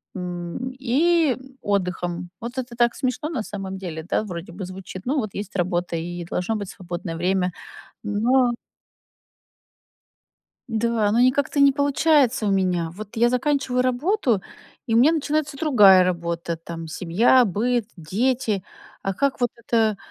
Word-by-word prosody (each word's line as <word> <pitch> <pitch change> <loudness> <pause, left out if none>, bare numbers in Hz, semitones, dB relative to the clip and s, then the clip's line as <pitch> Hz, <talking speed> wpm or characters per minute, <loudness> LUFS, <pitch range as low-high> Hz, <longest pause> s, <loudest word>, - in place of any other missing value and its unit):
м, 180 +7 -5
и 295 +3 +3 0.3
отдыхом. 180 -3 -2
Вот 240 +3 -7
это 245 -2 -6
так 240 0 +3
смешно 260 +4 -2
на 285 -9 -2
самом 195 -2 -6
деле, 165 -4 -6
да, - - +1
вроде 175 -4 -7
бы 185 +2 -6
звучит. 185 0 -8
Ну 275 +4 0
вот 215 -6 -4
есть 200 0 -6
работа, 175 -1 -1
и 175 +1 -4
должно 180 +5 -1
быть 200 -3 -4
свободное 175 -2 -6
время. 180 +2 0 0.5
Но 240 +4 +2 2.2
Да, 225 -1 +1
но 230 - +3
никак-то 265 +3 +2
не 280 - +7
получается 285 -3 +2
у 205 - +2
меня. 180 -4 +1
Вот 210 +5 -10
я 235 +1 +4
заканчиваю 255 0 +1
работу, 255 - +1 0.4
и 225 - 0
у - - +6
меня 280 +7 +6
начинается 300 -1 -1
другая 210 - +6
работа: 170 -2 -2
там 165 0 -7
семья, 195 +10 +3
быт, 225 +3 0
дети. 210 +4 -1 0.4
А 195 - -2
как 280 +7 0
вот 245 -1 +2
это, 225 -2 +1
215 Hz, 145 wpm, -23 LUFS, 180-255 Hz, 2.2 s, не